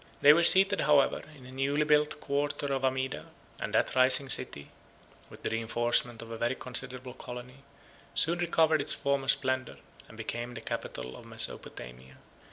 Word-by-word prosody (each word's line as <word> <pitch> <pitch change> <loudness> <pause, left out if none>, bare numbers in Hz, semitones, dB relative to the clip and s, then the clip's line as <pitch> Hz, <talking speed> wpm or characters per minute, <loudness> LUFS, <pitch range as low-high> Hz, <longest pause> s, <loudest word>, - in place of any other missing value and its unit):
They 145 +1 +8
were 170 - +3
seated, 190 +3 +6
however, 145 -1 +3 0.2
in 130 - -15
a 130 - -12
new 140 +3 0
built 150 0 +2
quarter 145 0 -2
of 135 -1 -2
Amida; 130 0 -2 0.3
and - - -4
that - - +1
rising 130 +1 +4
city, 70 - -2 0.6
with - - -15
the - - -2
reenforcement 120 +1 -1
of 115 - -12
a 115 - -7
very 120 +2 0
considerable 125 0 -3
colony, 125 +1 -9 0.6
soon 170 +2 +4
recovered 160 -3 +2
its 145 - 0
former 140 -1 -1
splendor, 130 -1 0 0.3
and - - -15
became 120 +1 -5
the - - -7
capital 65 - -6
of - - -13
Mesopotamia. 60 +2 -3
130 Hz, 165 wpm, -29 LUFS, 120-145 Hz, 0.6 s, They